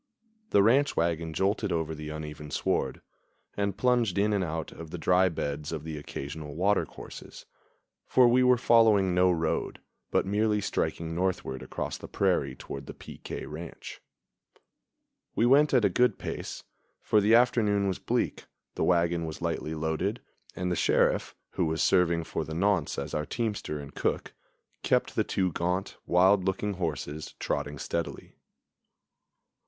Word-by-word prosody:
The 100 Hz, -, +5 dB
ranch 135 Hz, +7 st, +3 dB
wagon 85 Hz, -1 st, 0 dB
jolted 100 Hz, +4 st, 0 dB
over 80 Hz, -2 st, -1 dB
the 75 Hz, 0 st, -7 dB
uneven 75 Hz, -1 st, -7 dB
sward, -, -, -1 dB, 0.5 s
and 100 Hz, -1 st, -1 dB
plunged 120 Hz, -7 st, +2 dB
in 105 Hz, +2 st, +2 dB
and 100 Hz, -2 st, +1 dB
out 80 Hz, -2 st, -4 dB
of 80 Hz, -1 st, -9 dB
the 90 Hz, -, -6 dB
dry 90 Hz, +3 st, +3 dB
beds 75 Hz, -2 st, -4 dB
of 80 Hz, -2 st, -4 dB
the 80 Hz, -1 st, -5 dB
occasional 75 Hz, 0 st, -7 dB
water 100 Hz, +4 st, +2 dB
courses; -, -, -11 dB, 0.6 s
for 125 Hz, -1 st, +5 dB
we 125 Hz, +2 st, +4 dB
were 125 Hz, -1 st, +5 dB
following 110 Hz, -6 st, +4 dB
no 90 Hz, +1 st, +4 dB
road, 80 Hz, -2 st, -1 dB, 0.3 s
but -, -, +1 dB
merely 105 Hz, +2 st, +1 dB
striking 85 Hz, -4 st, -2 dB
northward 85 Hz, -7 st, -2 dB
across -, -, -5 dB
the -, -, -8 dB
prairie 80 Hz, -9 st, 0 dB
toward 70 Hz, 0 st, -8 dB
the -, -, -8 dB
P. -, -, -11 dB
K. -, -, -6 dB
ranch. 80 Hz, +2 st, -8 dB, 1.3 s
We 115 Hz, -, +3 dB
went 145 Hz, +4 st, +5 dB
at 125 Hz, -5 st, +4 dB
a -, -, +7 dB
good 125 Hz, +6 st, +2 dB
pace, -, -, -6 dB, 0.4 s
for 105 Hz, -, +3 dB
the 110 Hz, +3 st, +5 dB
afternoon 105 Hz, -4 st, +3 dB
was 95 Hz, -, -2 dB
bleak, -, -, -1 dB, 0.3 s
the -, -, -2 dB
wagon 85 Hz, -1 st, +2 dB
was 80 Hz, -, -6 dB
lightly 80 Hz, +1 st, -2 dB
loaded, 80 Hz, +8 st, -1 dB, 0.4 s
and 90 Hz, 0 st, -2 dB
the -, -, +1 dB
Sheriff, -, -, +2 dB, 0.2 s
who 90 Hz, -, 0 dB
was 80 Hz, +1 st, 0 dB
serving 85 Hz, -3 st, +3 dB
for -, -, -3 dB
the 80 Hz, -, -6 dB
nonce 90 Hz, -3 st, +1 dB
as 70 Hz, +1 st, -4 dB
our 75 Hz, 0 st, -2 dB
teamster 105 Hz, -10 st, -3 dB
and 70 Hz, 0 st, -9 dB
cook, -, -, -2 dB, 0.5 s
kept -, -, +1 dB
the -, -, +2 dB
two 95 Hz, -2 st, 0 dB
gaunt, 90 Hz, +3 st, -2 dB
wild 95 Hz, +2 st, +4 dB
looking 95 Hz, +2 st, -1 dB
horses 75 Hz, -4 st, -4 dB
trotting 75 Hz, 0 st, -2 dB
steadily. 85 Hz, +4 st, -4 dB
90 Hz, 160 wpm, -28 LUFS, 80-105 Hz, 1.3 s, a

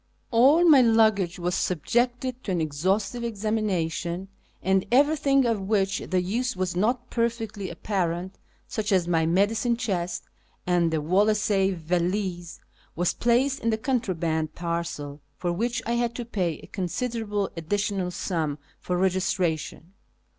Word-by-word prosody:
All 280 Hz, +9 st, +5 dB
my 290 Hz, -5 st, +8 dB
luggage 220 Hz, -6 st, +3 dB
was 175 Hz, 0 st, -2 dB
subjected 245 Hz, -, 0 dB
to 195 Hz, -, -2 dB
an 180 Hz, -, 0 dB
exhaustive 190 Hz, +9 st, -1 dB
examination, 195 Hz, -5 st, -2 dB, 0.3 s
and 190 Hz, 0 st, +2 dB
everything 275 Hz, 0 st, +4 dB
of 230 Hz, -4 st, 0 dB
which 195 Hz, -1 st, +1 dB
the 185 Hz, -1 st, -1 dB
use 240 Hz, +7 st, -1 dB
was 185 Hz, -1 st, -2 dB
not 240 Hz, +6 st, 0 dB
perfectly 225 Hz, -4 st, -2 dB
apparent 185 Hz, -2 st, -2 dB, 0.3 s
(such 215 Hz, -2 st, -3 dB
as 185 Hz, -3 st, +3 dB
my 165 Hz, -2 st, +2 dB
medicine 215 Hz, +7 st, +2 dB
chest 180 Hz, -7 st, -2 dB, 0.4 s
and 175 Hz, -2 st, +2 dB
the 160 Hz, -1 st, -1 dB
Wolseley 200 Hz, +3 st, +2 dB
valise), 175 Hz, +1 st, -2 dB, 0.4 s
was 175 Hz, +1 st, +1 dB
j)laced 255 Hz, +4 st, +2 dB
in 230 Hz, -, 0 dB
the 220 Hz, -, +1 dB
contraband 175 Hz, -, -1 dB
parcel, 170 Hz, -4 st, -4 dB, 0.2 s
for 175 Hz, -1 st, -1 dB
wliich 235 Hz, +5 st, -1 dB
I 235 Hz, -, -2 dB
had 235 Hz, -1 st, 0 dB
to 240 Hz, -, -4 dB
pay 180 Hz, -8 st, -1 dB
a -, -, -13 dB
considerable 210 Hz, +1 st, -2 dB
additional 195 Hz, +2 st, -1 dB
sum 165 Hz, -5 st, -2 dB, 0.2 s
for 180 Hz, -, -2 dB
regis 190 Hz, +1 st, +1 dB
tration. 165 Hz, -1 st, -2 dB
195 Hz, 140 wpm, -26 LUFS, 175-230 Hz, 0.4 s, my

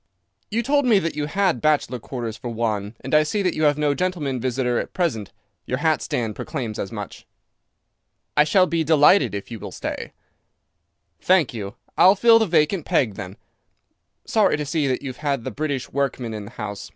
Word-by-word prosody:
"You 230 Hz, +3 st, -1 dB
told 285 Hz, +3 st, +2 dB
me 225 Hz, -4 st, +5 dB
that 165 Hz, -4 st, -1 dB
you 150 Hz, -1 st, -2 dB
had 190 Hz, +1 st, 0 dB
bachelor 150 Hz, -5 st, +1 dB
quarters 115 Hz, -2 st, -5 dB
for 120 Hz, -, -7 dB
one, 110 Hz, -2 st, -2 dB
and 135 Hz, -, -6 dB
I 155 Hz, -, +7 dB
see 200 Hz, +7 st, -1 dB
that 180 Hz, -, +1 dB
you 155 Hz, -, 0 dB
have 145 Hz, -1 st, +3 dB
no 150 Hz, -1 st, +1 dB
gentleman 150 Hz, -6 st, -2 dB
visitor 125 Hz, 0 st, 0 dB
at -, -, -6 dB
present. 135 Hz, -, -1 dB, 0.4 s
Your 125 Hz, -, -1 dB
hat 155 Hz, 0 st, +1 dB
stand 110 Hz, -4 st, -2 dB
proclaims 120 Hz, -9 st, -5 dB
as 95 Hz, -, -4 dB
much." 105 Hz, -3 st, -8 dB, 1.1 s
"I 150 Hz, -, +6 dB
shall 185 Hz, +5 st, +4 dB
be 165 Hz, -1 st, 0 dB
delighted 155 Hz, -, +4 dB
if 100 Hz, +3 st, -7 dB
you 115 Hz, -, -6 dB
will -, -, -7 dB
stay." -, -, -5 dB, 1.1 s
"Thank 185 Hz, -8 st, +3 dB
you. 100 Hz, -4 st, -6 dB, 0.2 s
I'll 190 Hz, +2 st, +7 dB
fill 230 Hz, +2 st, +6 dB
the 220 Hz, -, +1 dB
vacant 165 Hz, +1 st, +2 dB
peg 115 Hz, -7 st, +1 dB
then. 95 Hz, +1 st, -8 dB, 0.9 s
Sorry -, -, +2 dB
to 150 Hz, -, -3 dB
see 150 Hz, 0 st, 0 dB
that 130 Hz, +1 st, -1 dB
you've 130 Hz, -2 st, -6 dB
had 140 Hz, -5 st, -2 dB
the 130 Hz, -, -4 dB
British 140 Hz, 0 st, -3 dB
workman 135 Hz, -4 st, -2 dB
in 105 Hz, -1 st, -6 dB
the 105 Hz, -, -11 dB
house. 105 Hz, -2 st, -6 dB
145 Hz, 195 wpm, -22 LUFS, 115-165 Hz, 1.1 s, I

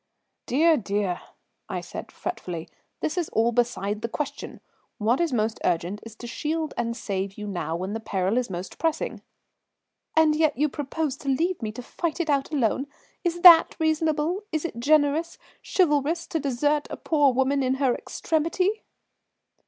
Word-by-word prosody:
"Dear, 315 Hz, +5 st, +4 dB
dear," 200 Hz, -4 st, -1 dB, 0.5 s
I -, -, -2 dB
said -, -, -8 dB
fretfully, 175 Hz, -, -5 dB, 0.3 s
"this 315 Hz, +4 st, -1 dB
is 340 Hz, -, -2 dB
all 230 Hz, +2 st, +2 dB
beside 220 Hz, -3 st, 0 dB
the 230 Hz, -, -2 dB
question. 295 Hz, +4 st, -5 dB, 0.4 s
What 230 Hz, +8 st, +2 dB
is 335 Hz, -3 st, +1 dB
most 220 Hz, -2 st, 0 dB
urgent 180 Hz, +4 st, 0 dB
is 230 Hz, -1 st, -11 dB
to 240 Hz, -, -10 dB
shield 310 Hz, +6 st, -2 dB
and 230 Hz, 0 st, -2 dB
save 195 Hz, -3 st, -3 dB
you 210 Hz, -, -5 dB
now 175 Hz, -5 st, -3 dB
when 185 Hz, +4 st, -3 dB
the 225 Hz, -, -2 dB
peril 200 Hz, +1 st, 0 dB
is 245 Hz, -, -3 dB
most 180 Hz, 0 st, -6 dB
pressing." 325 Hz, -1 st, -1 dB, 0.9 s
"And 315 Hz, -1 st, +5 dB
yet 310 Hz, -3 st, +2 dB
you 300 Hz, +2 st, +2 dB
propose 290 Hz, 0 st, -3 dB
to 280 Hz, -2 st, -5 dB
leave 330 Hz, +6 st, +1 dB
me 215 Hz, -2 st, -2 dB
to 250 Hz, -, -7 dB
fight 330 Hz, +5 st, -3 dB
it 320 Hz, -3 st, +1 dB
out 280 Hz, 0 st, 0 dB
alone? 270 Hz, -1 st, +1 dB, 0.4 s
Is 345 Hz, -1 st, -1 dB
that 340 Hz, -2 st, +9 dB
reasonable? 315 Hz, +3 st, +1 dB
Is 315 Hz, +1 st, -1 dB
it 270 Hz, -8 st, -5 dB
generous, 305 Hz, +4 st, +2 dB, 0.2 s
chivalrous, 330 Hz, -1 st, +1 dB
to 325 Hz, -, -1 dB
desert 290 Hz, +2 st, 0 dB
a -, -, -5 dB
poor 290 Hz, -4 st, +3 dB
woman 265 Hz, +2 st, +1 dB
in 260 Hz, 0 st, +1 dB
her 265 Hz, -2 st, +2 dB
extremity?" 340 Hz, -, -1 dB
275 Hz, 170 wpm, -25 LUFS, 225-315 Hz, 0.9 s, that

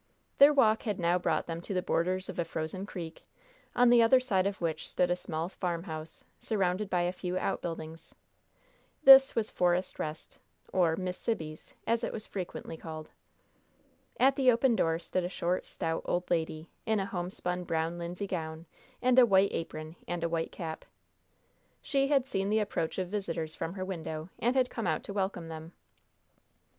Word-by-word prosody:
Their 280 Hz, +1 st, +9 dB
walk 225 Hz, -6 st, +4 dB
had 210 Hz, -4 st, -2 dB
now 175 Hz, +1 st, +2 dB
brought -, -, 0 dB
them 165 Hz, 0 st, -5 dB
to 195 Hz, -, -5 dB
the 180 Hz, -, +2 dB
borders 185 Hz, +2 st, 0 dB
of -, -, -6 dB
a -, -, +3 dB
frozen 165 Hz, +4 st, -4 dB
creek, 170 Hz, -5 st, -7 dB, 0.5 s
on 245 Hz, 0 st, +6 dB
the 240 Hz, -1 st, +7 dB
other 230 Hz, +3 st, +6 dB
side 200 Hz, -7 st, +1 dB
of 200 Hz, 0 st, -3 dB
which 160 Hz, -2 st, -2 dB
stood 180 Hz, -1 st, +1 dB
a -, -, +3 dB
small 165 Hz, -2 st, -4 dB
farmhouse, 165 Hz, -4 st, -5 dB, 0.2 s
surrounded 195 Hz, -1 st, 0 dB
by 180 Hz, -, +1 dB
a 175 Hz, 0 st, +1 dB
few 180 Hz, 0 st, -3 dB
outbuildings. 165 Hz, -4 st, -4 dB, 0.9 s
This 270 Hz, -1 st, +9 dB
was 225 Hz, -2 st, 0 dB
"Forest 180 Hz, +1 st, +1 dB
Rest," 155 Hz, 0 st, -6 dB, 0.3 s
or 170 Hz, -3 st, +3 dB
"Miss 180 Hz, 0 st, -4 dB
Sibby's," 160 Hz, -9 st, -4 dB
as 230 Hz, +1 st, +1 dB
it -, -, -1 dB
was 215 Hz, -1 st, -5 dB
frequently 180 Hz, -3 st, -6 dB
called. 155 Hz, -1 st, -8 dB, 1.1 s
At 270 Hz, +1 st, +5 dB
the 260 Hz, -2 st, +5 dB
open 240 Hz, +1 st, +3 dB
door 165 Hz, -5 st, +2 dB
stood 180 Hz, +2 st, -2 dB
a 175 Hz, -, -2 dB
short, 180 Hz, 0 st, -1 dB
stout 165 Hz, 0 st, -2 dB
old 180 Hz, 0 st, -1 dB
lady, 160 Hz, -1 st, -1 dB, 0.2 s
in 220 Hz, -1 st, +2 dB
a 195 Hz, -, -1 dB
homespun 180 Hz, -1 st, -3 dB
brown 165 Hz, +1 st, -1 dB
linsey 175 Hz, +3 st, -4 dB
gown, 160 Hz, -3 st, -4 dB, 0.4 s
a 255 Hz, -, +4 dB
white 195 Hz, -3 st, +4 dB
apron, 155 Hz, 0 st, -5 dB
and 175 Hz, -1 st, -3 dB
a 170 Hz, -, +1 dB
white 165 Hz, -1 st, -1 dB
cap. 160 Hz, -3 st, -6 dB, 1.0 s
She 275 Hz, -1 st, +1 dB
had 275 Hz, -3 st, +3 dB
seen 195 Hz, -6 st, -1 dB
the 215 Hz, -, +3 dB
approach 170 Hz, -6 st, -2 dB
of 185 Hz, -2 st, -2 dB
visitors 165 Hz, -6 st, -3 dB
from 165 Hz, -, -4 dB
her 185 Hz, -1 st, -3 dB
window, 160 Hz, -3 st, -5 dB
and 240 Hz, +3 st, +1 dB
had 255 Hz, -1 st, +2 dB
come 225 Hz, -5 st, -3 dB
out 160 Hz, -2 st, 0 dB
to 200 Hz, -, -6 dB
welcome 190 Hz, -4 st, -2 dB
them. 160 Hz, +1 st, -8 dB
180 Hz, 180 wpm, -30 LUFS, 165-205 Hz, 1.1 s, Their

